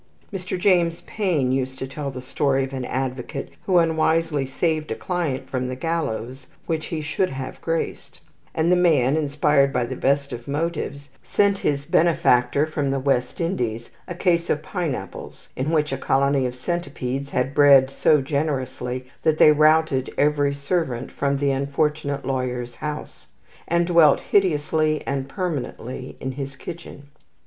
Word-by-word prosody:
Mr. 185 -1 -3
James 175 -2 +2
Payn 175 -11 0
used 130 0 -1
to 130 - -4
tell 140 +1 -5
the 130 -1 -7
tale 135 +1 0
of 135 0 -1
an 130 -1 -3
advocate 130 +2 -4 0.2
who 185 -2 +4
unwisely 160 -3 +2
saved 155 +2 -1
a - - -2
client 150 -8 -2
from 130 -1 -2
the 130 - -4
gallows 130 -4 -3 0.2
which 160 -2 -2
he 160 -2 -3
should 150 +5 0
have 135 -1 -6
graced; 165 0 -3 0.4
and 160 +2 +2
the - - +6
man, 155 -7 +3
inspired 145 -2 +2
by 125 -2 0
the 130 +2 -5
best 140 +1 0
of 120 0 -8
motives, 145 -1 -3
sent 200 -1 +1
his 140 -1 -1
benefactor 150 -5 +3
from 150 -3 -2
the 135 0 0
West 130 -2 0
Indies 120 - -2 0.2
a 175 - -5
case 170 -1 +1
of 150 - 0
pineapples 155 - -5
in 130 +4 -2
which 150 -3 +1
a 135 - -2
colony 135 -1 +2
of 125 - -6
centipedes 140 -3 -3
had 130 0 -1
bred 140 -2 +6
so 150 +1 +3
generously 130 -3 -2 0.2
that 155 -1 +2
they 155 - +7
routed 155 -3 +3
every 145 -1 +2
servant 140 -4 -2
from 140 0 0
the 140 0 +1
unfortunate 140 +1 -1
lawyer's 125 -2 -3
house, 150 0 -6 0.4
and 170 0 +2
dwelt 165 -4 +5
hideously 155 -4 +1
and 135 0 -2
permanently 135 - -4
in 130 - -3
his 135 0 -6
kitchen. 165 -1 -9
140 Hz, 155 wpm, -23 LUFS, 130-160 Hz, 0.4 s, they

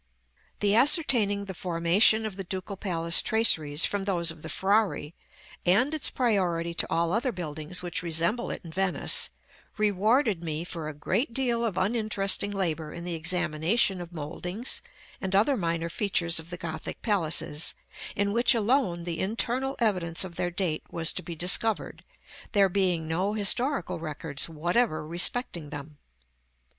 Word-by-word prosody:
The 205 -1 +3
ascertaining 230 - +4
the 190 - -6
formation 180 +6 +2
of 215 -3 -4
the 195 - -5
Ducal 190 +2 -5
Palace 170 -3 +2
traceries 160 -9 +3
from 200 -1 -2
those 170 -4 +1
of 160 -1 -12
the 160 - -8
Frari, 195 -4 0 0.5
and 225 - +3
its 310 - +2
priority 180 -8 0
to 165 - -1
all 170 0 +1
other 245 +4 0
buildings 160 -1 -4
which 175 +2 -2
resemble 170 +7 0
it - - -5
in 165 - -8
Venice, 190 +1 +1 0.5
rewarded 215 - +2
me 160 0 -3
for 165 -3 -6
a 155 - -8
great 205 - -1
deal 240 -3 +1
of 215 -6 -2
uninteresting 205 -1 +1
labor 165 -6 -2
in 170 - -7
the 175 - -3
examination 175 +4 +1
of 175 0 -9
mouldings 175 - -3 0.4
and 190 0 -2
other 225 +8 +4
minor 170 -5 -1
features 170 -2 -1
of 160 +1 -11
the 175 - -6
Gothic 160 -2 -6
palaces, 165 -6 0 0.4
in 200 0 0
which 240 +3 +4
alone 215 -6 +1
the 170 -1 -4
internal 245 +6 -1
evidence 180 -8 0
of 185 -2 -8
their 175 +1 -2
date 175 -3 -2
was 165 -1 +1
to - - -5
be 170 0 -7
discovered, 185 +6 0 0.5
there 200 -2 +4
being 180 -4 0
no 185 +6 0
historical 215 - +1
records 150 -1 -3
whatever 170 +3 0
respecting 175 - 0
them. 145 0 -9
180 Hz, 155 wpm, -27 LUFS, 165-215 Hz, 0.5 s, ascertaining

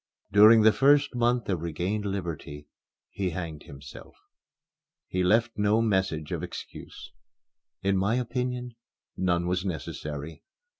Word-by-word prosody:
During 110 +2 +7
the 110 - +7
first 140 +3 +3
month 120 0 +1
of 90 -5 -1
regained 90 +6 -3
liberty, 85 -7 -5 0.5
he 95 -2 -2
hanged 80 -3 -6
himself. 70 0 -12 0.9
He 90 0 -2
left 115 +4 +2
no 105 +2 +3
message 95 -8 0
of - - -2
excuse. - - -9 0.7
In 100 0 +2
my 100 +5 +1
opinion, 125 0 -3 0.4
none 85 -2 0
was 90 +1 -1
necessary. 75 -3 -6
95 Hz, 120 wpm, -27 LUFS, 85-115 Hz, 0.9 s, During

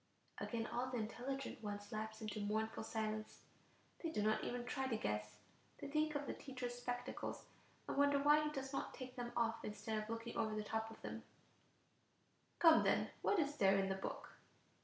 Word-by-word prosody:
Again 230 -2 -1
all 245 +2 -1
the 250 - -1
intelligent 245 +5 -3
ones 205 -1 -4
lapse 220 +1 -3
into 215 0 -3
mournful 220 +2 0
silence; 215 -1 -3 0.6
they 330 - -1
do 210 -10 0
not 215 0 +3
even 245 0 -2
try 265 +1 -1
to 230 -4 +1
guess; 105 - -2 0.4
they - - -5
think 305 +1 +1
of 290 0 0
the - - -2
teacher's 255 -3 -4
spectacles, 245 +1 -3 0.4
and - - -1
wonder 285 0 +6
why 295 +2 +6
he 300 - +1
does 270 -2 -4
not - - -2
take 255 -1 -7
them 240 -2 -3
off 230 -1 +1
instead 215 +1 -2
of 215 - -7
looking 230 +1 -3
over 215 -1 +1
the 215 - -1
top 220 +1 -1
of 225 - -11
them: - - -4 1.4
"Come 325 -2 +8
then; - - +3
what 410 - +3
is 290 -3 +1
there 195 -1 +6
in 195 0 +2
the 190 - +1
book?" 190 - -4
230 Hz, 190 wpm, -40 LUFS, 215-270 Hz, 1.4 s, Come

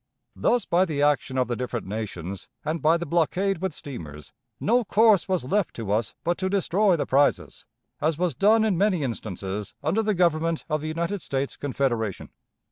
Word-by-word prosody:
Thus, 245 -1 +1
by 180 +2 +3
the 145 -5 -1
action 145 -2 +1
of 130 - +2
the 120 - -1
different 125 -2 -4
nations 100 -3 -5 0.2
and 155 0 -2
by 160 +3 +4
the 170 - -4
blockade 175 +3 +1
with 190 0 -1
steamers, 75 - -9 0.3
no 240 +3 +2
course 215 -3 +4
was 185 -8 0
left 200 +8 0
to 110 -4 -4
us 110 +1 0
but 175 +1 0
to 190 0 0
destroy 195 0 +2
the 160 - -1
prizes, 140 +2 +1 0.3
as 155 0 0
was 180 -1 0
done 215 +2 +4
in 195 -6 +1
many 195 -6 +2
instances 105 -4 -5
under 195 +8 +1
the 215 -1 0
Government 165 -2 +1
of 155 -1 -1
the 155 - -4
United 170 +5 -2
States 135 0 -3
Confederation. 120 -7 -2
155 Hz, 185 wpm, -25 LUFS, 125-190 Hz, 0.3 s, by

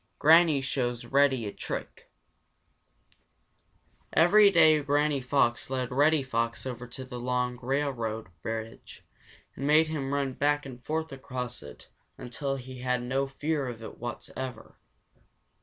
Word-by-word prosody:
Granny 160 -2 +6
Shows 125 -3 -2
Reddy 135 -4 +2
a 100 - -5
Trick - - -7 2.0
Every 200 +5 +6
day 160 -5 +5
Granny 145 0 +1
Fox 125 -2 +1
led 130 -1 -2
Reddy 145 +3 +3
Fox 115 -2 -2
over 125 -1 -6
to 130 +2 -8
the 125 -1 -7
long 125 0 -1
railroad 120 -6 -2
bridge 115 +2 -7 0.5
and 140 - -3
made 155 +1 +5
him 140 -4 -3
run 140 -2 -1
back 145 +2 +1
and 125 -2 -10
forth 160 +1 -2
across 125 -2 -6
it 75 - -12 0.3
until 135 +3 -4
he 130 -1 -9
had 125 -1 -1
no 135 +2 -1
fear 145 +1 -2
of 115 -2 -7
it - - -9
whatever. 125 +2 -7
130 Hz, 135 wpm, -28 LUFS, 125-145 Hz, 2.0 s, Granny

